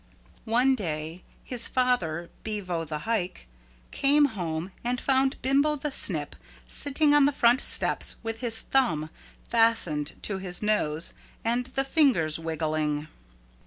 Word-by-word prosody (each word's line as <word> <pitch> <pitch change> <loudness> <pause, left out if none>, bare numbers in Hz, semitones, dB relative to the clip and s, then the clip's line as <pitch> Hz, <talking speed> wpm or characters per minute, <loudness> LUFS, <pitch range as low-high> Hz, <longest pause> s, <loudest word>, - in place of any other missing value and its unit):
One 250 +4 +4
day 160 -5 -4 0.2
his 245 -2 -1
father, 175 -11 0
Bevo 185 -6 -3
the 155 0 -4
Hike, 185 - -2 0.4
came 290 +2 +4
home 170 -2 -4
and 245 +1 -1
found 265 0 +1
Bimbo 280 +3 +3
the 295 0 -3
Snip - - +2 0.3
sitting 290 +1 +1
on 290 -1 +6
the - - +2
front 245 -2 +3
steps - - +1
with 225 0 -4
his 230 -2 -2
thumb 160 - 0 0.4
fastened 225 -11 +1
to 195 -2 -1
his 185 +1 -3
nose 165 -7 0 0.3
and 240 +2 0
the 270 +1 -1
fingers 255 - +3
wiggling. 155 -2 -2
225 Hz, 130 wpm, -27 LUFS, 165-260 Hz, 0.4 s, on